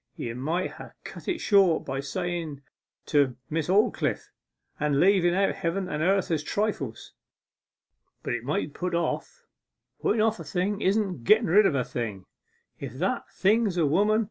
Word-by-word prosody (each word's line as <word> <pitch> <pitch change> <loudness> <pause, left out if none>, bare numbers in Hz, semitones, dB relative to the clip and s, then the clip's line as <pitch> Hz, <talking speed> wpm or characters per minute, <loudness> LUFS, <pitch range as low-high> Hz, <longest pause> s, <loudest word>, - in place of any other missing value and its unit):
You 115 - -4
might 160 +9 -2
ha' - - -11
cut - - -10
it 350 - -1
short 195 -5 +3
by 135 0 -3
sayen 160 0 -4 0.4
"to 140 -4 +2 0.2
Miss 160 -1 -1
Aldclyffe," 210 +5 +1 0.5
and 150 -2 +1
leaven 180 -1 +4
out 195 +1 +2
heaven 190 0 -2
and 150 -3 -3
earth 190 +1 +2
as 160 -2 +1
trifles. 155 - -3 1.1
But - - -2
it 120 -1 -3
might 150 +3 -1
be - - -16
put 180 -1 -1
off; 465 - -3 0.6
putten 220 - +1
off 220 0 +1
a - - -6
thing 200 +3 -2
isn't 190 - 0
getten 220 - +5
rid 205 +2 +6
of 140 - 0
a 130 - +1
thing, 110 -6 -5 0.5
if 135 -4 -6
that 175 +9 -2
thing 220 +4 +2
is 180 -3 -3
a 165 - +3
woman. 205 +9 +3
175 Hz, 170 wpm, -27 LUFS, 145-200 Hz, 1.1 s, rid